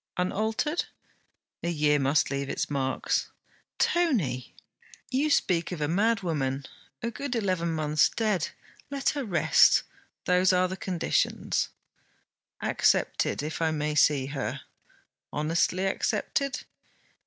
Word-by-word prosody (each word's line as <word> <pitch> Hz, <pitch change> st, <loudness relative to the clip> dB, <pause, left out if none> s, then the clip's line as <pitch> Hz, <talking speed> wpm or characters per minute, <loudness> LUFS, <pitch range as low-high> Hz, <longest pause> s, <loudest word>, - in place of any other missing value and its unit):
'Unaltered?' 220 Hz, -, 0 dB, 0.8 s
'A 170 Hz, -, -1 dB
year 150 Hz, -3 st, +2 dB
must 140 Hz, +2 st, +2 dB
leave 140 Hz, 0 st, -2 dB
its -, -, -2 dB
marks.' 135 Hz, -2 st, -1 dB, 0.5 s
'Tony!' 205 Hz, -, +1 dB, 0.6 s
'You 275 Hz, +4 st, +1 dB
speak 175 Hz, -, +1 dB
of 175 Hz, -, -4 dB
a 150 Hz, -, 0 dB
madwoman, 165 Hz, -9 st, 0 dB, 0.4 s
a 235 Hz, -, -1 dB
good 265 Hz, +1 st, -4 dB
eleven 185 Hz, -6 st, 0 dB
months 155 Hz, -2 st, +2 dB
dead. 210 Hz, -9 st, 0 dB, 0.4 s
Let 280 Hz, -1 st, 0 dB
her 285 Hz, -2 st, -2 dB
rest. 175 Hz, -, +4 dB, 0.4 s
Those 180 Hz, +1 st, +4 dB
are 185 Hz, 0 st, +3 dB
the 185 Hz, -, -5 dB
conditions.' 185 Hz, -3 st, 0 dB, 0.9 s
'Accepted, -, -, +1 dB
if 155 Hz, +2 st, -4 dB
I 165 Hz, -, +3 dB
may 150 Hz, -1 st, -1 dB
see 145 Hz, -2 st, +3 dB
her.' 140 Hz, +1 st, -4 dB, 0.7 s
'Honestly 165 Hz, +5 st, 0 dB
accepted?' 275 Hz, +7 st, -1 dB
170 Hz, 115 wpm, -27 LUFS, 150-215 Hz, 0.9 s, rest